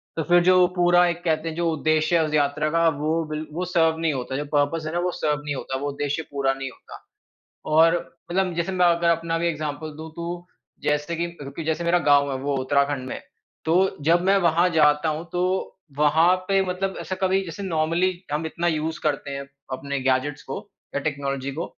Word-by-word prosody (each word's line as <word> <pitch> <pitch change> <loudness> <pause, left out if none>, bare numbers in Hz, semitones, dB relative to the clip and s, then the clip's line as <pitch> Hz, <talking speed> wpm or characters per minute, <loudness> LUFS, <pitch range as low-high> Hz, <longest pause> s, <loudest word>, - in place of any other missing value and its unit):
तो 160 - -1
फिर 175 0 +6
जो 185 0 +6
पूरा 175 0 +5
एक 170 0 -3
कहते 160 -1 0
हैं 160 - -6
जो 170 0 0
उद्देश्य 155 +2 +2
है 160 - +3
उस 155 - -4
यात्रा 145 0 +1
का 165 0 +3
वो 160 +2 0
बिल 155 +1 -3
वो 180 +2 -2
सर्व 165 -2 +2
नहीं 165 -2 +1
होता 130 0 -4
जो 145 +2 -2
पर्पस 145 +3 +1
है 155 - -4
ना 175 - 0
वो 180 +1 0
सर्व 150 -3 -1
नहीं 145 -1 -3
होता, 130 0 -4
वो 145 +2 -3
उद्देश्य 145 +2 -2
पूरा 135 -1 +1
नहीं 135 0 -5
होता। - - -14 0.7
और 165 +2 +6 0.4
मतलब 185 -1 +1
जैसे 170 +2 -1
मैं 180 -1 +3
अगर 170 0 +3
अपना 165 0 0
भी 170 - 0
एग्ज़ाम्पल 155 -1 -3
दूँ 160 +1 -7
तो 175 +1 -5 0.4
जैसे 150 +3 0
कि 160 -3 -7
जैसे 160 +2 -1
मेरा 170 +1 +3
गाँव 140 -1 +5
है 130 - -2
वो 140 0 0
उत्तराखंड 140 0 0
में - - -5 0.5
तो 160 - +2 0.3
जब 170 +2 +4
मैं 195 +1 +5
वहाँ 170 0 +3
जाता 155 -1 +3
हूँ 155 +2 -3
तो, 180 +1 0 0.3
वहाँ 160 +4 +4
पे 195 0 +3
मतलब 190 +1 -2
ऐसा 185 - -4
कभी 190 0 +2
जैसे 170 +4 -7
नॉर्मली 170 +1 +1 0.2
हम 155 +2 -1
इतना 170 +2 -2
यूज़ 160 0 -1
करते 145 -2 -1
हैं 140 0 -5 0.2
अपने 140 +2 -3
गैजेट्स 130 +2 0
को 135 - -5 0.4
या - - +2
टेक्नोलॉजी 140 -2 -3
को 165 +5 -4
160 Hz, 210 wpm, -24 LUFS, 145-170 Hz, 0.7 s, फिर